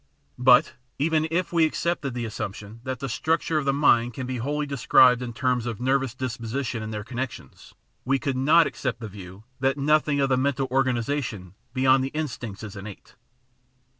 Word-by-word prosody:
But, 125 Hz, 0 st, +5 dB, 0.2 s
even 155 Hz, +1 st, +1 dB
if 175 Hz, +2 st, -1 dB
we 165 Hz, -1 st, +4 dB
accepted 155 Hz, -4 st, -1 dB
the 120 Hz, -1 st, -3 dB
assump 110 Hz, -2 st, -4 dB
tion 105 Hz, +2 st, -11 dB
that 130 Hz, -1 st, -3 dB
the 135 Hz, -, -2 dB
structure 160 Hz, +5 st, 0 dB
of 145 Hz, -, -4 dB
the 140 Hz, -, +3 dB
mind 120 Hz, -5 st, +3 dB
can 130 Hz, -, -4 dB
be 130 Hz, 0 st, -3 dB
wholly 145 Hz, +5 st, -2 dB
described 130 Hz, -2 st, +4 dB
in 125 Hz, -1 st, -4 dB
terms 125 Hz, 0 st, -1 dB
of 115 Hz, -4 st, -4 dB
nervous 130 Hz, 0 st, 0 dB
disposition 120 Hz, -1 st, -3 dB
and 110 Hz, 0 st, -5 dB
their 105 Hz, -1 st, -4 dB
connections, 125 Hz, +1 st, -7 dB, 0.3 s
we 135 Hz, +2 st, +1 dB
could 135 Hz, +1 st, -2 dB
not 155 Hz, +6 st, +5 dB
accept 125 Hz, -4 st, -3 dB
the 110 Hz, -, -6 dB
view 95 Hz, 0 st, -11 dB, 0.2 s
that 135 Hz, +1 st, +1 dB
nothing 150 Hz, 0 st, +2 dB
of 135 Hz, -1 st, +2 dB
the 130 Hz, -, +3 dB
mental 135 Hz, 0 st, 0 dB
organ 130 Hz, -1 st, +2 dB
isation 115 Hz, -7 st, -3 dB, 0.2 s
beyond 130 Hz, +1 st, +3 dB
the 135 Hz, -, -2 dB
instincts 120 Hz, -9 st, -5 dB
is 105 Hz, -2 st, -8 dB
innate. 100 Hz, 0 st, -10 dB
130 Hz, 190 wpm, -25 LUFS, 115-140 Hz, 0.3 s, But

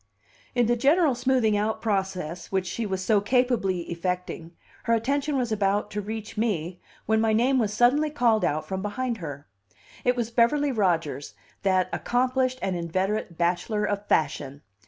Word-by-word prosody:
In 245 Hz, -1 st, +3 dB
the 240 Hz, +2 st, +2 dB
general 290 Hz, +4 st, +3 dB
smoothing 245 Hz, -3 st, +2 dB
out 215 Hz, +2 st, 0 dB
process 190 Hz, -5 st, -2 dB
which 190 Hz, -1 st, 0 dB
she 215 Hz, +5 st, -3 dB
was 190 Hz, -1 st, -3 dB
so 210 Hz, -3 st, +3 dB
capably 215 Hz, -5 st, +1 dB
effecting, 170 Hz, -1 st, -4 dB, 0.4 s
her 230 Hz, -, +2 dB
attention 275 Hz, +5 st, 0 dB
was 245 Hz, -3 st, -1 dB
about 205 Hz, -1 st, 0 dB
to 210 Hz, -, -2 dB
reach 215 Hz, +1 st, -6 dB
me, 180 Hz, -6 st, -1 dB, 0.2 s
when 220 Hz, +1 st, +2 dB
my 220 Hz, -1 st, +2 dB
name 255 Hz, +4 st, +3 dB
was 215 Hz, -4 st, +1 dB
suddenly 250 Hz, +8 st, +3 dB
called 240 Hz, -7 st, +2 dB
out 155 Hz, +1 st, 0 dB
from 190 Hz, 0 st, -3 dB
behind 235 Hz, +4 st, -2 dB
her. 145 Hz, -4 st, -7 dB, 0.6 s
It 250 Hz, 0 st, +2 dB
was 235 Hz, -2 st, -2 dB
Beverly 275 Hz, +5 st, +3 dB
Rodgers, 165 Hz, -, -1 dB, 0.3 s
that 185 Hz, -2 st, +2 dB
accomplished 255 Hz, +1 st, 0 dB
and 190 Hz, -, 0 dB
inveterate 185 Hz, +2 st, -2 dB
bachelor 180 Hz, +5 st, 0 dB
of 205 Hz, 0 st, -3 dB
fashion. 145 Hz, -2 st, 0 dB
210 Hz, 160 wpm, -26 LUFS, 185-245 Hz, 0.6 s, In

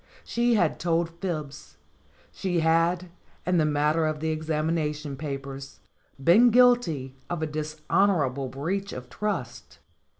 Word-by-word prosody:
She 235 Hz, 0 st, +1 dB
had 175 Hz, -7 st, +1 dB
told 170 Hz, 0 st, 0 dB
fibs. 145 Hz, -, -5 dB, 0.5 s
She 180 Hz, -3 st, -1 dB
had, 170 Hz, +2 st, +2 dB, 0.3 s
in 180 Hz, -1 st, +2 dB
the 155 Hz, -, +3 dB
matter 150 Hz, +2 st, +2 dB
of 155 Hz, -1 st, -2 dB
the 160 Hz, +1 st, -1 dB
examination 155 Hz, -2 st, -2 dB
papers, 135 Hz, -1 st, -6 dB, 0.4 s
been 215 Hz, -, +7 dB
guilty 240 Hz, -, +3 dB, 0.2 s
of 175 Hz, -2 st, -2 dB
a -, -, +2 dB
dishonorable 155 Hz, -2 st, 0 dB
breach 180 Hz, +10 st, -3 dB
of 125 Hz, -1 st, -8 dB
trust. 195 Hz, -, -4 dB
160 Hz, 125 wpm, -26 LUFS, 145-180 Hz, 0.5 s, been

